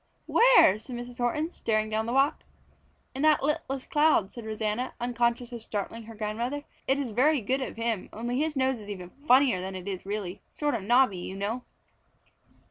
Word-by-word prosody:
"Where?" 465 - +6
said 245 +3 -8
Mrs. 245 0 -8
Horton, 300 +7 0
staring 215 -6 -1
down 220 +1 -1
the - - -1
walk. 275 +3 +2 0.7
"In 265 - -4
that 305 -2 +4
littlest 275 -3 -2
cloud," 295 -10 +3
said 235 -2 -8
Rosanna, 220 +3 -2
unconscious 240 0 0
of 235 -1 -6
startling 220 +1 -5
her 225 0 -10
grandmother. 230 +7 -3 0.2
"It 270 - +3
is 275 -5 -3
very 280 +7 +3
good 260 +5 -1
of - - -4
him, 230 -4 -2
only 240 +4 -3
his 310 0 0
nose 260 -2 +1
is 210 -1 -11
even 180 -3 -7 0.2
funnier 255 -7 +5
than 190 +1 -5
it 185 +1 -7
is 190 -2 -4
really. 200 -2 -4
Sort 295 -1 -1
of 230 - -1
knobby, 235 -2 +3
you 185 +2 -6
know." 215 +5 -3
235 Hz, 190 wpm, -28 LUFS, 215-265 Hz, 0.7 s, Where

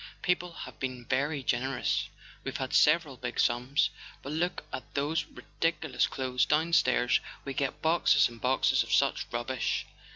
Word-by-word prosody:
People 180 -1 0
have - - -9
been 130 -2 -4
very 140 +3 0
generous: 125 +1 0 0.3
we've - - -4
had - - -4
several 150 -3 +4
big 120 0 -5
sums. 125 +4 +2 0.3
But 140 - -5
look 170 +4 -1
at - - -7
those 150 +3 0
ridiculous 165 -3 -1
clothes 130 -1 -1
down 160 +3 +1
stairs—we 130 0 +1
get 140 0 -2
boxes 165 +2 +4
and 115 -1 -13
boxes 130 +1 +3
of - - -4
such - - +2
rubbish 120 +2 -1
135 Hz, 150 wpm, -29 LUFS, 125-160 Hz, 0.3 s, several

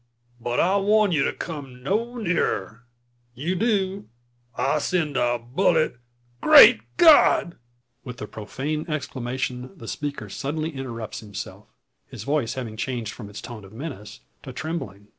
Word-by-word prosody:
But 120 +1 -2
I 190 +3 +3
warn 210 0 +3
you 150 -5 +2
to - - +1
come 135 -6 -7
no 230 - -1
nearer. 125 - -1 0.5
If - - -29
you 175 +4 +1
do, 200 -1 0 0.5
I'll 140 +3 +1
send 155 -3 -1
a 120 -1 +2
bullet 150 +4 +1 0.4
Great - - +9 0.2
God!" 300 - +6 0.5
With 125 -3 -8
the 105 - -5
profane 140 +10 -4
exclamation, 130 -3 -4
the 115 - -10
speaker 145 +3 -4
suddenly 155 +3 -3
interrupts 120 -6 -6
himself, 105 -3 -8 0.4
his - - -9
voice 140 -4 0
having 115 -4 -5
changed 120 -3 -3
from 105 -4 -9
its 105 - -8
tone 115 -4 -9
of 95 +2 -14
menace 115 -5 -8 0.2
to - - -8
trembling. 105 - -6
135 Hz, 145 wpm, -24 LUFS, 120-170 Hz, 0.5 s, Great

